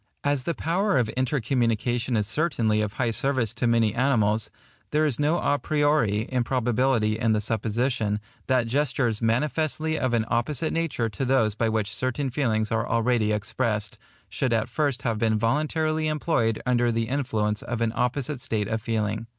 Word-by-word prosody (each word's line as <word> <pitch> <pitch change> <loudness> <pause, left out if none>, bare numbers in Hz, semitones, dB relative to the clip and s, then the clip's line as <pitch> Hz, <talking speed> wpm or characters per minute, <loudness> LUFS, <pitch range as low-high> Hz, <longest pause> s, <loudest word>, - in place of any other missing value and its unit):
As 145 -3 0
the 170 - -1
power 185 +7 +1
of 120 -3 +1
intercommunication 120 -2 0
is 105 - +1
certainly 115 -6 +1
of 105 -1 -2
high 120 -3 0
service 125 -2 0
to 120 +1 -1
many 115 -2 +3
animals, 110 -4 +2 0.4
there 155 +1 +2
is 145 -4 0
no 150 +3 +2
à 145 -4 0
priori 145 -8 +1
improbability 120 -3 +1
in 115 -2 +2
the 105 - +2
supposition, 110 0 -1 0.3
that 130 -3 +2
gestures 125 -3 0
manifestly 155 +6 0
of 130 -2 +1
an 110 -1 +1
opposite 125 +6 0
nature 165 -8 -1
to 110 +6 -4
those 125 -5 +2
by 115 +1 0
which 110 -2 -1
certain 130 +3 -2
feelings 110 -5 0
are 115 +1 0
already 115 -1 +2
expressed, 105 0 -2 0.3
should 130 -3 -1
at 110 -1 0
first 145 -5 -1
have 115 -3 -1
been 110 -1 +2
voluntarily 155 +6 0
employed 150 -8 0
under 120 -1 +2
the 115 0 -1
influence 110 -6 -1
of 120 -1 -4
an 115 -1 0
opposite 125 +2 -1
state 110 -5 -1
of 110 0 -2
feeling. 110 0 -2
120 Hz, 165 wpm, -25 LUFS, 110-140 Hz, 0.4 s, many